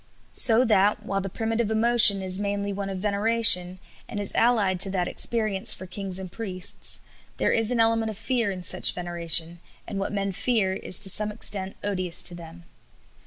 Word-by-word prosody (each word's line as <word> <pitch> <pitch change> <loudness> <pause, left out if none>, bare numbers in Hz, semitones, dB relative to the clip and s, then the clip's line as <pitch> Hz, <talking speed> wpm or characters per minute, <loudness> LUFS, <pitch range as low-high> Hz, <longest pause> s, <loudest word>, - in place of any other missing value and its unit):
So 240 +1 +4
that, 210 -1 0
while 195 -2 -3
the 195 - -7
primitive 225 +2 -4
emotion 220 -3 +6
is 185 0 -5
mainly 200 0 -4
one 195 0 -6
of 190 - -6
veneration, 200 -2 +3 0.3
and 205 - -6
is 205 - -3
allied 210 -6 0
to 195 - +6
that 185 -2 -3
experienced 215 -2 -1
for 185 - -10
kings 185 0 -5
and 190 -2 -5
priests, 185 -5 -4 0.4
there - - -1
is 225 -1 0
an 245 -2 -1
element 225 0 0
of 215 - -9
fear 235 -1 -2
in 185 -2 -7
such - - +1
veneration, 170 -1 0 0.3
and 195 - -6
what 195 - -4
men 200 -1 -4
fear 200 -1 -1
is 190 -2 +1
to 195 - +5
some 210 +2 -1
extent 200 -3 -1
odious 185 -4 0
to - - +2
them. 170 0 -13
200 Hz, 185 wpm, -23 LUFS, 185-220 Hz, 0.4 s, emotion